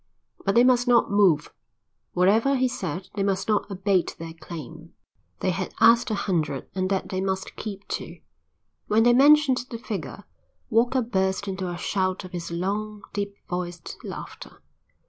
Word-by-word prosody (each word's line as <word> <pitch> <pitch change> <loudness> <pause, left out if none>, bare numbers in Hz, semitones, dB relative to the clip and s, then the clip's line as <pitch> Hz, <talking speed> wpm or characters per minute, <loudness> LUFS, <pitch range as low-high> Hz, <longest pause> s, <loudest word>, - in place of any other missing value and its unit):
But 195 - +1
they 240 - +7
must 250 -1 +4
not 240 -4 +4
move; 190 -7 +3 0.6
whatever 215 +9 +3
he 260 0 +2
said 185 -7 -4
they 200 - -2
must 195 -1 0
not 215 -1 +1
abate 195 -2 0
their 165 0 -7
claim; 165 0 -10 0.5
they 185 - +1
had 185 +1 -4
asked 230 +2 +6
a 215 - 0
hundred 155 -9 -1
and 185 0 -1
that 195 -1 -1
they 185 0 -2
must 190 0 -3
keep 200 -2 -7
to. - - -5 0.7
When 220 +2 +4
they 240 +1 +6
mentioned 280 -1 +5
the 230 - -5
figure, 200 - -6 0.5
Walker 240 +3 +3
burst 190 -3 -1
into 190 -1 -3
a 175 - -4
shout 185 +1 -1
of 185 - -9
his 175 -2 -5
long, 205 +4 -3
deep 200 0 -3
voiced 175 -3 -5
laughter. - - -9
195 Hz, 165 wpm, -25 LUFS, 180-225 Hz, 0.7 s, they